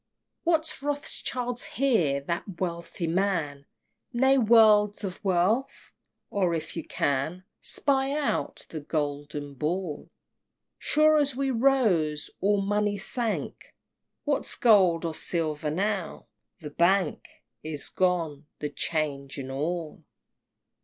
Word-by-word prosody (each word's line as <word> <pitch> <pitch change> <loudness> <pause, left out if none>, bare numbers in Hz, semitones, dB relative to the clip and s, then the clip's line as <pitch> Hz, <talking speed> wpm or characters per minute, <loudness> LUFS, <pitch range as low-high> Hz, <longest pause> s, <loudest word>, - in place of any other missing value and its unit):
XXVIII. - - -57
What's 320 -4 +1
Rothschild 255 -4 -3
here, 180 - +2
that 170 +4 -4
wealthy 170 -1 -3
man! 165 -6 -1 0.4
Nay, 265 +2 +4
worlds 215 -3 +5
of 190 +1 -5
wealth? 195 +7 0 0.4
Oh, 185 -4 +1
if 160 -1 -4
you 165 - -3
can 145 +8 -1 0.2
Spy 270 -1 +1
out, 295 - -2
the 160 - -5
Golden 145 -1 -3
Ball! 155 +3 -3 0.7
Sure 310 +1 +4
as 285 -3 +2
we 270 0 0
rose, 220 - +2
all 205 +1 +2
money 205 0 0
sank: 225 +2 -4 0.5
What's 290 -2 -1
gold 185 -8 +4
or 165 - -2
silver 155 -2 -2
now? 190 +2 -2 0.4
the 150 -2 -7
Bank 180 -3 +1 0.2
Is 155 -2 -5
gone 165 -5 0
the 150 - -4
'Change 140 -4 -2
and 135 -1 -5
all! 160 +3 -3
180 Hz, 115 wpm, -27 LUFS, 155-230 Hz, 0.7 s, worlds